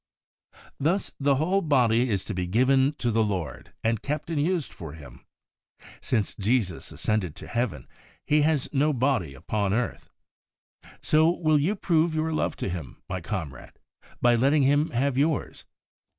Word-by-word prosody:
Thus 170 +7 0
the 140 -1 +3
whole 180 +8 +1
body 125 - +3
is 100 -4 -1
to 105 - -4
be 90 -1 -2
given 130 +7 +3
to 120 -5 -1
the 110 0 +2
Lord, 90 - -4
and 115 -1 +1
kept 150 +5 -3
and 150 -3 0
used 170 -1 -1
for 80 -4 -8
Him. 70 -6 -13 0.8
Since 110 -4 -1
Jesus 105 -4 0
ascended 95 -8 -1
to - - -10
Heaven, 120 -3 -2 0.4
He 150 0 +3
has 150 -3 +1
no 150 +2 +2
body 120 - 0
upon 100 +8 -1
earth. 120 +1 -3 0.9
So, 155 +1 +4
will 155 -3 +2
you 175 +9 +1
prove 165 -4 +1
your 160 +1 0
love - - -1
to - - -4
Him, 85 -6 -7
my 95 - -4
comrade, 80 - -6 0.5
by 120 0 +4
letting 135 +5 +3
Him 145 +3 +3
have 130 +2 0
yours 150 0 -1
130 Hz, 160 wpm, -26 LUFS, 105-150 Hz, 0.9 s, So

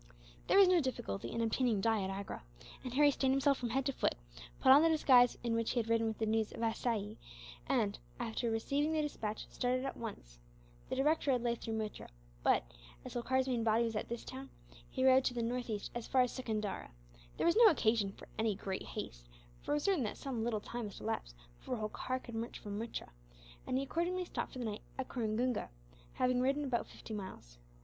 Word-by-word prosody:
There - - +4
was 395 -1 +9
no 360 -2 +5
difficulty 115 - -3
in 230 - -1
obtaining 230 -1 +2
dye 225 +1 +2
at 190 - -2
Agra, 195 +1 -5 0.4
and 255 - -4
Harry 290 +1 +6
stained 265 -1 +2
himself 275 0 +3
from 240 - -2
head 265 +2 0
to 275 - 0
foot, - - +1 0.4
put 260 - +6
on 280 +2 +9
the 330 - +5
disguise 255 -6 +5
in 235 -1 0
which 230 0 0
he 250 - +1
had 230 -1 -2
ridden 230 0 +3
with 220 - -2
the 220 - 0
news 220 0 +1
of 230 - -5
Assaye 220 -2 -1 0.5
and, - - +1 0.2
after 230 +1 -1
receiving 280 +7 0
the 310 -1 +1
despatch, 220 -7 -3
started 255 +1 0
at 270 - -3
once. - - -8 0.5
The - - -1
direct 295 +4 +2
road 250 -3 +2
lay 240 -1 +2
through 225 -1 -4
Muttra 215 -1 -5 0.3
but, - - +3 0.4
as - - -7
Holkar's 260 +2 +1
main 245 -3 0
body 225 +1 +3
was 225 -1 -2
at 210 - -3
this 235 0 -4
town, 265 +1 -7 0.4
he 260 -1 0
rode 260 0 +7
to 245 - 0
the 235 - 0
northeast 235 -3 -2
as 240 -1 -5
far 260 - +4
as 250 - +2
Secundara. 215 -6 -3 0.5
There - - 0
was 340 - +4
no 465 0 +9
occasion 220 - +2
for - - -13
any 220 -2 +2
great 190 -1 -4
haste, - - -7 0.3
for - - -2
it - - +3
was 295 - -1
certain 380 -9 +2
that 210 - -4
some 250 -5 -3
little 225 -3 -1
time 240 +1 -5
must 205 - -8
elapse - - -3 0.2
before 250 - -3
Holkar 220 +4 -2
could 235 - -9
march 225 +1 -4
from 205 -1 -5
Muttra; 230 +1 -5 0.6
and 255 - +1
he 270 - 0
accordingly 350 +6 -1
stopped - - -4
for - - -7
the 245 - -3
night 210 -1 -4 0.2
at 265 - -4
Coringunga, 240 +1 -1 0.4
having 250 0 +2
ridden 275 +3 +1
about 245 -3 -1
fifty 220 - -9
miles. 185 - -8
235 Hz, 220 wpm, -35 LUFS, 220-265 Hz, 0.6 s, was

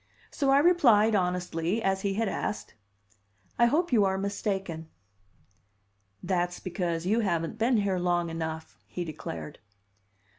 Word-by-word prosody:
So 280 -2 0
I 270 - +6
replied, 255 -10 +5
honestly, 180 0 0
as 190 0 +1
he 195 -1 -1
had 225 +1 0
asked: 205 - -4 0.9
"I 235 - +6
hope 315 +4 +1
you 215 -4 +5
are 190 -1 +1
mistaken." 195 -5 -3 1.3
"That's 175 -1 -1
because 175 -2 -3
you 215 +5 +2
haven't 175 -1 -1
been 235 +2 +3
here 195 -3 0
long 175 -1 0
enough," 160 -1 -5
he 175 - -5
declared. 85 - -7
190 Hz, 135 wpm, -28 LUFS, 175-220 Hz, 1.3 s, I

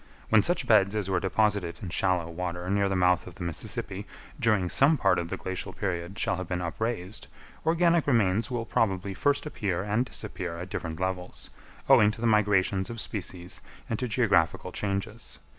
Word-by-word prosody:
When - - +6
such - - 0
beds 100 +2 +4
as 100 -3 -1
were 95 - +2
deposited 100 -4 0
in 95 - -4
shallow 90 -1 +1
water 90 +1 -4
near 100 0 +2
the 95 - 0
mouth 90 -1 +3
of 90 - -10
the 90 - -6
Mississippi 95 +4 -3 0.3
during 105 -7 +2
some 140 - +4
part 95 -7 +3
of 85 -1 -4
the - - -3
glacial 95 -1 -5
period 90 0 -3
shall - - 0
have 95 -1 -5
been 90 -1 -2
upraised, 95 +2 -4 0.4
organic 170 -1 +3
remains 115 -3 +2
will 120 -3 -2
probably 100 -3 0
first 145 +9 +1
appear 100 - -2
and 105 +4 +1
disappear 90 -8 -5
at 90 +3 -7
different 80 -1 -4
levels, 90 -1 -4 0.4
owing 105 - +7
to 110 - -5
the 120 - -2
migrations 100 -3 +2
of 115 0 -6
species 90 -4 -5 0.3
and 110 - -1
to 125 - -1
geographical 105 - +2
changes. 100 +3 -4
95 Hz, 180 wpm, -28 LUFS, 90-110 Hz, 0.4 s, owing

